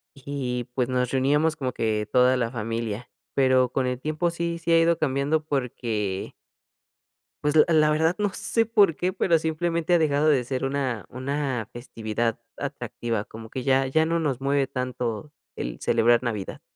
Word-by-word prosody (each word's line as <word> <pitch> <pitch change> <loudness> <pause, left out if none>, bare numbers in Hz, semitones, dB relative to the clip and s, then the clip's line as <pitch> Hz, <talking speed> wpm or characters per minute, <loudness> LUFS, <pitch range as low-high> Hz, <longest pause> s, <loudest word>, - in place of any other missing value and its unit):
Y, 130 -3 -4
pues, 125 -1 0
nos 125 -1 0
reuníamos 145 +4 +2
como 130 -3 -3
que 110 -2 -1
toda 125 +1 +4
la 115 -2 -1
familia, 115 -1 -4 0.2
pero 130 -2 +3
con 130 -1 0
el 125 0 -2
tiempo 155 +4 -1
sí, 170 0 -2
sí 170 0 -2
ha 165 - +6
ido 165 0 +3
cambiando 145 +1 0
porque 115 -8 -2 1.1
pues, 150 +1 +1
la 155 - +8
la 155 -1 +5
verdad 160 +3 +2
no 205 -2 +1
sé 230 -1 0
por 205 -8 +4
qué, 180 +1 -1
pero 170 -3 +3
simplemente 165 +2 0
ha 175 - +5
dejado 150 -1 +2
de 135 -4 +3
ser 130 +2 -2
una 130 -8 -2
una 130 -3 -2
festividad 115 -1 -3 0.2
atractiva, 115 -5 -3
como 110 0 -10
que 130 0 -5
ya 135 0 +3
ya 160 +4 +2
no 170 +1 0
nos 135 -5 -1
mueve 140 -1 +1
tanto 125 0 -3 0.2
el - - -5
celebrar 120 +1 +3
Navidad. 105 -5 -4
135 Hz, 170 wpm, -25 LUFS, 120-155 Hz, 1.1 s, la